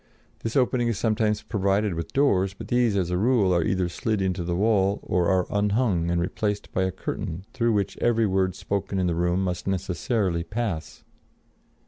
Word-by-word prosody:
This 115 - -4
opening 125 -2 +2
is 115 -3 0
sometimes 110 -1 +1
provided 100 -1 0
with 85 0 -5
doors; 100 -9 +2
but - - -9
these, 120 -4 +2
as 90 -2 0
a 90 - 0
rule, 110 -4 +3
are 85 -1 +2
either 95 +1 0
slid 110 +4 -2
into 95 -2 -1
the 85 0 -2
wall 100 0 +2
or 90 -2 +1
are 95 -1 +2
unhung 100 -4 +1
and 85 0 +1
replaced 100 +4 -2
by 95 - +1
a 95 - -1
curtain 85 +1 -5
through 115 -3 +1
which 100 -2 -1
every 115 -1 +2
word 95 -2 +1
spoken 100 0 -3
in 95 - +1
the 85 - +1
room 90 +2 +1
must 90 -1 -3
necessarily 95 -1 -1
pass. 100 -4 -4
95 Hz, 185 wpm, -25 LUFS, 90-110 Hz, -, rule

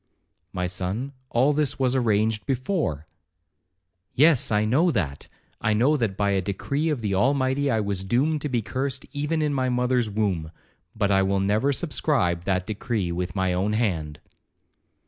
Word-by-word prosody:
'My 90 -1 -2
son, 95 +9 -3 0.2
all 130 +5 +3
this 150 -1 0
was 130 -1 +1
arranged 110 -2 +1
before.' 130 - -1 1.1
'Yes, 150 -1 +4
I 105 0 +2
know 145 +11 +3
that—I 95 - -3
know 130 +8 +3
that 115 -8 -1
by 100 -1 +1
a 95 -1 +1
decree 140 - -2
of 145 -6 -1
the 105 -3 -1
Almighty 130 +5 +1
I 110 -4 +1
was 100 -2 -2
doomed 140 +9 +1
to 150 - -3
be 120 -4 0
cursed 130 +3 -3
even 150 +2 -1
in 150 -1 0
my 130 -2 0
mother's 125 -2 +1
womb, 100 -7 -1 0.5
but 100 -2 +1
I 95 0 +4
will 95 0 +1
never 105 +8 +2
subscribe 130 - 0
that 90 -1 0
decree 105 -3 -2
with 90 +1 -3
my 95 -2 +1
own 95 +4 0
hand.' 85 -10 -1
110 Hz, 165 wpm, -25 LUFS, 95-135 Hz, 1.1 s, Yes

